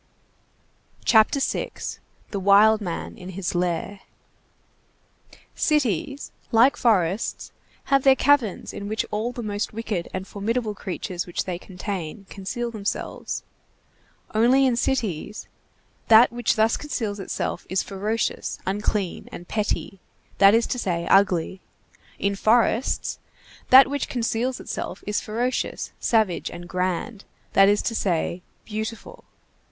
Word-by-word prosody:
CHAPTER 220 +4 +5
VI—THE 205 -5 -4
WILD 205 +3 +5
MAN 175 -4 -5
IN 180 - -8
HIS 190 -1 -3
LAIR 175 +2 -1 1.5
Cities, 275 - 0 0.2
like 235 +4 +5
forests, 195 -3 +1 0.3
have 275 -1 +3
their 270 0 +6
caverns 265 -8 +2
in 200 - -6
which 215 +1 -1
all 220 +3 -1
the 240 -1 -6
most 205 0 -3
wicked 210 -6 -3
and 185 +1 -5
formidable 220 +2 -2
creatures 185 -2 -5
which 175 - -2
they 180 -2 -4
contain 185 -1 -6
conceal 235 +5 -4
themselves. 210 -3 -4 0.9
Only, 245 +5 +4
in 255 -2 +3
cities, 215 -6 -2 0.6
that 225 +2 +7
which 240 -1 0
thus 220 +1 +3
conceals 220 -8 -3
itself 195 - -4
is 190 +1 +1
ferocious, 210 +3 -2
unclean, 200 -1 -2
and 175 - -9
petty, 205 -2 -2 0.4
that 200 +2 +7
is 230 0 +3
to 250 - -3
say, 170 -5 -1
ugly; 190 -1 +3 0.6
in 200 0 0
forests, 230 +3 +2 0.5
that 260 +1 +9
which 285 0 -3
conceals 245 +1 -1
itself - - -5
is 210 - -1
ferocious, 240 +4 -2
savage, 215 -6 +1
and 175 0 -9
grand, 185 +4 -2 0.3
that 195 0 +6
is 205 0 +2
to - - -1
say, 180 -3 -1 0.2
beautiful. 220 +1 -6
210 Hz, 125 wpm, -24 LUFS, 190-235 Hz, 1.5 s, that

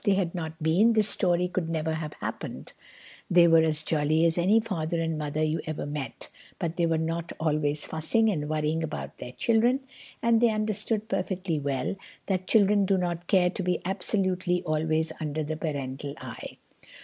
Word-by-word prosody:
If - - -19
they 200 - +4
had 185 -3 0
not 160 -2 -5
been, 190 +9 +4
this 215 -2 +3
story 180 -2 +2
could 180 -2 -2
never 160 -1 -1
have 155 -1 -4
happened. - - -6 0.6
They 175 -1 +6
were 165 -1 +6
as 155 -1 +2
jolly 155 +1 +2
as 165 -1 +3
any 190 +6 +4
father 170 -7 -2
and 165 -1 -1
mother 150 0 -2
you 155 +1 0
ever 155 -1 -3
met, 145 -2 -5 0.3
but 170 -2 -3
they 170 -1 +1
were 165 -1 +1
not 165 +1 -2
always 150 -2 0
fussing 160 +8 +1
and 150 -5 -3
worrying 155 +1 0
about 160 -2 -5
their 125 - -7
children, 235 - +2 0.4
and 230 -1 +3
they 240 - +5
understood 215 0 -1
perfectly 180 -7 -2
well 140 +5 -2 0.3
that 185 -2 -1
children 205 -2 +4
do 195 -1 +3
not 175 -1 -2
care 180 -2 +4
to 190 - -4
be 180 -1 0
absolutely 185 -2 0
always 155 0 0
under 155 0 -2
the 155 +1 -3
parental 140 -2 -4
eye. - - -8
165 Hz, 185 wpm, -27 LUFS, 155-190 Hz, 0.6 s, They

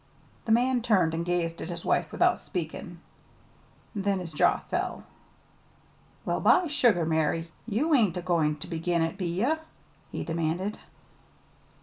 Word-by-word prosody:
The 225 - -1
man 245 +2 +3
turned 190 -8 +3
and 165 +1 -1
gazed 170 -1 -1
at - - -5
his 170 -1 -6
wife - - +1
without - - +3
speaking. 170 -1 -6 0.9
Then 200 -2 0
his 175 -3 -6
jaw 150 - +4
fell. - - -3 1.2
"Well, - - 0
by 365 - +5
sugar, 240 - +3
Mary! 160 +1 0 0.2
You 260 +9 +1
ain't 210 - +3
a 180 - -4
goin' 165 -4 +2
ter 150 - -9
begin 170 0 0
it, 165 +2 -2
be 185 -2 -3
ye?" 200 - +1 0.6
he - - -3
demanded. 170 +5 -2
175 Hz, 145 wpm, -28 LUFS, 165-210 Hz, 1.2 s, by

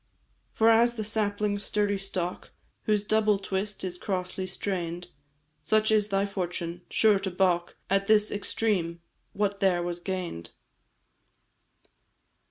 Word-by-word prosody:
"For 225 +1 +5
as 235 +1 +4
the 220 - -3
sapling's 205 -1 -1
sturdy 205 -1 0
stalk, 185 -2 -4 0.4
Whose 210 -1 +2
double 215 -1 +3
twist 195 +1 -3
is 180 -1 -4
crossly 185 -1 -3
strain'd, 175 -2 -3 0.5
Such 215 +7 +2
is 210 -1 +4
thy 195 -1 +1
fortune 175 -3 -4
sure 215 -3 +4
to 195 0 -2
baulk 180 -2 +1
At 195 0 +1
this 215 -1 +4
extreme 200 -5 -1 0.3
what 200 0 -1
there 180 -3 +2
was 175 0 -3
gain'd. 175 - -4
195 Hz, 125 wpm, -28 LUFS, 180-210 Hz, 0.5 s, For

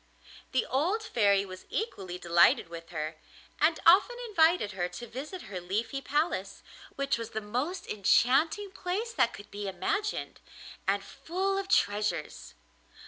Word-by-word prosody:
The 260 - +1
old 350 - 0
Fairy 200 - +3
was 185 -1 -10
equally 190 - -3
delighted 170 -1 +4
with 165 0 -9
her, 155 -1 -4 0.4
and 315 +2 +3
often 400 +8 +6
invited 330 - +3
her 180 -2 -2
to 240 - -8
visit 280 - -7
her 190 -2 -6
Leafy 215 +9 -2
Palace, 270 - -1 0.3
which 275 -4 0
was 230 -1 -5
the - - +3
most 250 - -3
enchanting 275 - +2
place 415 +5 -3
that 235 - +3
could 205 -2 -12
be 205 0 -5
imagined, 410 - -2 0.5
and - - +1
full 380 +4 -2
of 390 0 -2
treasures. 205 - 0
245 Hz, 140 wpm, -29 LUFS, -, 0.5 s, often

